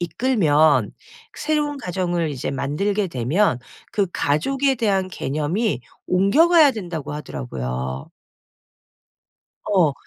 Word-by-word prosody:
이끌면 165 - +2 0.4
새로운 295 -1 -1
가정을 175 - -2
이제 130 -3 -4
만들게 185 +9 -1
되면 130 - +1 0.3
그 200 -2 +1
가족에 270 - +1
대한 195 -5 0
개념이 155 - -2 0.3
옮겨가야 290 - +5
된다."고 170 - -5
하더라고요. 65 - -5 1.5
어. 180 -8 +3
175 Hz, 225 characters per minute, -22 LUFS, 145-215 Hz, 1.5 s, 옮겨가야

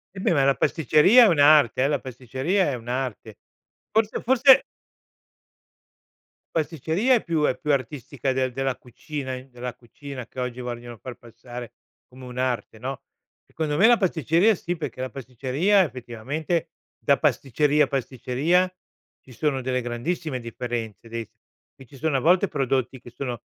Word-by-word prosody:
E - - -7
beh 185 - +2
ma 140 -4 +3
la 135 0 +3
pasticceria 160 - +5
è - - +6
un'arte 145 - +5
eh, - - +3
la 150 - 0
pasticceria 130 - -1
è - - -3
un'arte. 120 -2 -5 0.5
Forse, 220 -1 +1
forse 260 +2 +6 1.9
pasticceria 165 - +1
è 230 - 0
più 165 -3 0
è 130 - +2
più 150 - -1
artistica 135 0 -2
del 130 -1 0
della 135 +1 -1
cucina 130 +2 -7
in 130 +1 -11
della 125 0 -6
cucina 125 +2 -9
che - - -10
oggi 125 0 -3
vogliono 120 -1 -7
far 125 +4 -8
passare 120 +1 -10 0.3
come 130 0 -13
un'arte, 125 -2 -3
no. 130 +2 -5 0.4
Secondo 150 -2 -3
me 195 - +5
la 240 0 +6
pasticceria 175 - +2
sì, 175 -1 -4
perché 155 -5 -6
la 130 - -4
pasticceria 135 - +1
effettivamente, 145 +5 -3 0.3
da 140 -1 +2
pasticceria 145 +1 +2
pasticceria, 140 +7 0 0.5
ci 130 - -18
sono 135 +1 -1
delle 125 0 -1
grandissime 130 +4 -3
differenze 115 -2 -5
dei 115 0 -4
s - - -23 0.4
qui 135 - -14
ci 135 - -15
sono 150 0 0
a - - +1
volte 180 +7 +4
prodotti 135 -3 -1
che 120 - -13
sono 120 -2 -5
135 Hz, 155 wpm, -24 LUFS, 125-160 Hz, 1.9 s, è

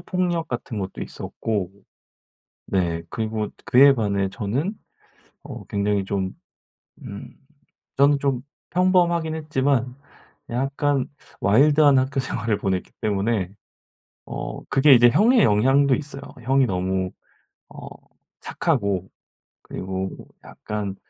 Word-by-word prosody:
폭력 175 -2 -1
같은 120 -4 -5
것도 95 -1 -5
있었고 100 -5 -4 1.0
네 85 -3 0
그리고 110 -1 -2 0.2
그에 135 +2 +6
반해 100 -4 0
저는 120 - -2 0.7
어 - - -8
굉장히 100 -1 0
좀 95 -1 -2 0.7
음 - - -8 0.7
저는 140 +1 +4
좀 135 -3 -1 0.3
평범하긴 175 -3 +2
했지만 135 -5 0 0.5
약간 135 +2 0 0.3
와일드한 145 +6 +5
학교생활을 130 -5 -1
보냈기 95 -2 -2
때문에 100 -2 0 0.8
어 - - -6
그게 140 +1 +6
이제 120 0 +7
형의 225 - +4
영향도 130 +6 +4
있어요. 140 -2 -7 0.2
형이 135 +2 +3
너무 95 -1 -1 0.6
어 - - -10 0.5
착하고 100 - -1 0.5
그리고 95 0 -4
뭐 - - -12 0.2
약간 105 -2 -5
125 Hz, 225 characters per minute, -23 LUFS, 100-140 Hz, 1.0 s, 이제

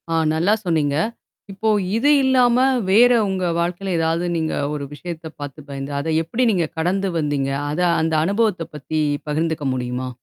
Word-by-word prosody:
ஆ 165 - 0 0.2
நல்லா 170 +6 +2
சொன்னீங்க. 155 -5 +1 0.6
இப்போ 200 +3 -1 0.3
இது 280 +6 +2
இல்லாம 250 -2 +4 0.3
வேற 235 +6 +6 0.2
உங்க 190 -1 -1
வாழ்க்கையில 180 +2 -2
ஏதாவது 165 +2 0
நீங்க 160 -1 -1 0.2
ஒரு 145 -1 -4
விஷயத்த 165 +1 -7
பார்த்து 145 0 -8
பயந்து, 140 0 -5
அத 140 - -4 0.2
எப்படி 225 +10 -1
நீங்க 175 -5 +1
கடந்து 190 +4 0
வந்தீங்க? 145 -3 -1 0.2
அத 150 - -3 0.2
அந்த 160 0 0
அனுபவத்த 200 -1 +1
பத்தி 155 +2 -3 0.3
பகிர்ந்துக்க 155 0 -1
முடியுமா? 125 0 -3
165 Hz, 155 wpm, -21 LUFS, 150-195 Hz, 0.6 s, வேற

